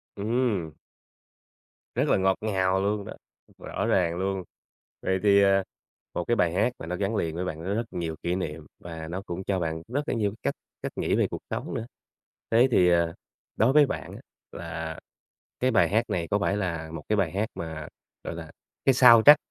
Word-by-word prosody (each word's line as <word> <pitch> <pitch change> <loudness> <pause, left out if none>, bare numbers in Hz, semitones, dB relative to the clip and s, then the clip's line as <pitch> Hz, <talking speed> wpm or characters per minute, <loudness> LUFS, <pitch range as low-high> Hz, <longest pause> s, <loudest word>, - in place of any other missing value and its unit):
Ừm. 105 -6 0 1.2
Rất - - +1
là - - +4
ngọt 95 0 +3
ngào 95 -3 +1
luôn 100 0 -1
đó, - - -7 0.4
rõ - - -4
ràng 85 -3 +2
luôn! 95 0 -1 0.6
Vậy 95 0 0
thì, 100 -1 +6
à, 95 0 +4 0.5
một 90 - -1
cái 120 - +3
bài 85 -5 +2
hát 105 +6 +2
mà - - -7
nó 90 +2 -3
gắn 100 +3 -1
liền 80 -5 -1
với 90 - -2
bạn, 80 -3 -5
nó 100 +2 -1
rất 115 +2 -1
nhiều 80 -2 -3
kỷ 85 - 0
niệm, 80 -4 -5
và 80 -2 -7
nó 90 +3 -4
cũng 90 +2 -5
cho 95 -1 0
bạn 80 -1 -2
rất 145 +5 -2
là - - +1
nhiều 105 -3 +1
cái 105 - -13
cách - - 0 0.3
cách - - -4
nghĩ - - 0
về - - +3
cuộc - - -5
sống - - -4
nữa. 115 - -3 0.7
Thế 120 +3 +6
thì, 90 -6 +5
ờ, 85 -1 +2 0.4
đối 115 +5 +3
với 150 0 +7
bạn - - -5
á, - - -9 0.3
là 80 -1 -6 0.6
cái 130 - +3
bài 95 -8 +4
hát 110 +5 +1
này 85 -2 -1
có 105 - +3
phải 100 0 0
là 85 -5 -3
một 80 - -6
cái 105 - +2
bài 95 -6 +1
hát 105 +4 -1
mà, 80 -2 -6 0.4
gọi - - -4
là, - - -8 0.3
cái 135 - +5
soundtrack 125 +3 +9
95 Hz, 210 wpm, -27 LUFS, 85-110 Hz, 1.2 s, soundtrack